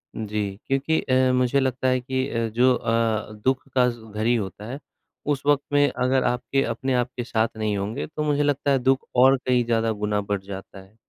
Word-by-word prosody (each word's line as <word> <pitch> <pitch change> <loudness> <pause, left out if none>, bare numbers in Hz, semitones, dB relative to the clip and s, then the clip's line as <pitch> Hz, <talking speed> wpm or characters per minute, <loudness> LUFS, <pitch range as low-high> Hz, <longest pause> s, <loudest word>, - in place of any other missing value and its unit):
जी। 105 -1 -3 0.3
क्योंकि 135 +4 +1
अ, 130 -1 +2
मुझे 125 +2 +2
लगता 130 -1 0
है 130 0 +2
कि 130 +1 -2
अ, 115 -1 -1
जो 125 +3 +3
अ, 115 -2 0
दुःख 130 +1 +1
का 125 -1 +5
ज़ 120 -1 -7
घरी 110 +3 +1
होता 105 -1 -4
है 140 - -6 0.5
उस 135 - -5
वक़्त 145 -1 +3
में 145 0 +5
अगर 130 +1 +1
आपके 125 +3 0
अपने 130 +3 -2
आप 125 0 +1
के 120 - -2
साथ 115 -1 +1
नहीं 105 -2 -1
होंगे 100 +3 -3
तो 155 0 -4
मुझे 145 -1 +1
लगता 145 0 +1
है 135 - +3
दुःख 130 +1 +1
और 130 +2 +6
कहीं 125 -1 +1
ज़्यादा 115 -1 +1
गुना 105 0 0
बढ़ 100 -1 -2
जाता 95 0 -9
है। 95 +3 -20
125 Hz, 210 wpm, -24 LUFS, 110-135 Hz, 0.5 s, और